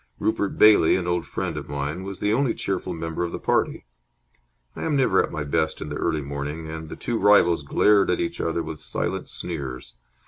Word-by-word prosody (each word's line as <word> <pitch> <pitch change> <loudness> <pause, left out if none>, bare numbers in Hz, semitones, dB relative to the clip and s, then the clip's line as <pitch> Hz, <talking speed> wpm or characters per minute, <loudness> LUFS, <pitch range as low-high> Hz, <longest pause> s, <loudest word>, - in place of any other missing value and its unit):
Rupert 100 -2 -1
Bailey, 105 -6 +6
an 95 - -1
old 85 -4 -1
friend - - -3
of - - -7
mine, 70 +4 -3
was 95 0 -6
the 105 +1 +1
only 130 +1 +1
cheerful 95 -1 -2
member 80 +1 -3
of 85 - -3
the - - -4
party. - - 0 0.9
I - - -7
am 155 - 0
never 125 -9 +4
at - - -5
my 75 - -3
best 70 - -1
in 75 - -6
the 75 - -4
early 80 -2 -1
morning, 70 +3 -5
and 80 0 -7
the - - -6
two 120 -2 -2
rivals 95 -5 +5
glared 100 +8 +3
at - - +1
each 170 -1 -2
other 80 0 -1
with 80 -1 -7
silent - - -3
sneers. 65 -2 -6
85 Hz, 210 wpm, -24 LUFS, 75-100 Hz, 0.9 s, Bailey